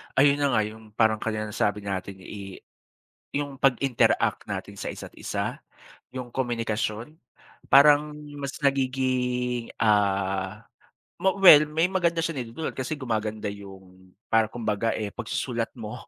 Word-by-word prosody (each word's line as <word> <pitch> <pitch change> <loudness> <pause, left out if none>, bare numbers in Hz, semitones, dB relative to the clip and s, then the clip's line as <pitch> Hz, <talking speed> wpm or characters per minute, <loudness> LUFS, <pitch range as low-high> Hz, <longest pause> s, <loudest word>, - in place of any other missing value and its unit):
Ayun 140 +1 +5
na 140 -3 +2
nga 110 - +4
yung, 110 0 -9
parang 110 -1 +3
kanina 110 -1 -3
nasabi 105 0 -1
natin 100 -1 -4
eh, 100 -2 -9 0.7
yung 145 -1 -3
pag-interact 135 -1 +2
natin - - -5
sa - - -5
isa't-isa. - - -5 0.6
Yung 125 -1 -5
komunikasyon 120 +1 -2 0.5
parang 150 +2 +6 0.3
mas 140 -1 -4
nagiging 130 -3 0
ah, 100 -1 +1 0.6
ma 190 - +3
well, 160 -6 +9
may 160 +3 +2
maganda 175 -3 0
siyang 155 -6 -2
naidudulot 120 +7 -6
kasi 130 +4 -3
gumaganda 110 -4 -2
yung 95 -2 -13 0.2
parang 110 -1 +3
kumbaga 115 -1 -1
eh, 105 -2 -3
pagsusulat - - -3
mo. - - -8
115 Hz, 125 wpm, -26 LUFS, 105-135 Hz, 0.7 s, well